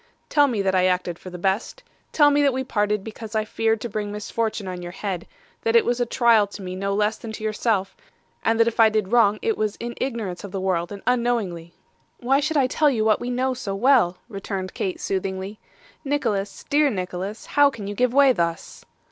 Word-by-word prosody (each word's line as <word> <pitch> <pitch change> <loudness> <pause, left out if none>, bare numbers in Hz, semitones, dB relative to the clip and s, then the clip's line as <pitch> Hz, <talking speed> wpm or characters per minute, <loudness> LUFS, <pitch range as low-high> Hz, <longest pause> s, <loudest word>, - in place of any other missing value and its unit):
'Tell 290 -1 +4
me 220 -7 -1
that 190 -1 +1
I 185 -1 +3
acted 180 -2 -1
for 185 - -9
the 180 - -8
best. 195 - -2 0.3
Tell 295 -2 +5
me 290 0 +3
that 280 -2 +3
we 260 +1 -2
parted 210 -4 0
because 220 0 -8
I 215 0 +1
feared 225 0 0
to - - -3
bring 210 -2 -4
misfortune 215 0 -3
on 180 -1 -5
your 175 0 -7
head; 190 -2 -4 0.3
that 460 0 0
it 465 - +6
was 245 0 0
a 245 - 0
trial 230 -4 +4
to 200 0 -10
me 185 0 -5
no 195 +1 -2
less 210 +1 +1
than 225 - -8
to 215 - -8
yourself, 215 -2 0 0.5
and 225 0 +1
that 230 - +5
if 235 - -2
I 225 -1 +7
did 215 -2 -1
wrong 215 -4 +4
it 445 -1 0
was 215 -1 0
in 235 0 -6
ignorance 225 -9 -3
of 200 - -7
the 195 - -3
world 180 -2 -1
and 200 -1 -8
unknowingly.' 230 -9 -1 0.4
'Why 265 +3 +2
should 305 +2 0
I 275 - +4
tell 295 +4 +2
you 225 -5 0
what 215 -1 +3
we 245 - -4
know 255 +1 0
so 215 -6 -4
well?' 220 -6 +3
returned 195 -3 -5
Kate 185 - -3
soothingly. 190 +1 -3 0.4
'Nicholas 230 -9 -2
dear 295 0 +3
Nicholas 185 0 -4
how 290 0 +4
can 230 -7 -8
you 205 - -4
give 250 +4 +1
way 275 0 +5
thus? 170 -4 -3
215 Hz, 225 wpm, -23 LUFS, 195-245 Hz, 0.5 s, I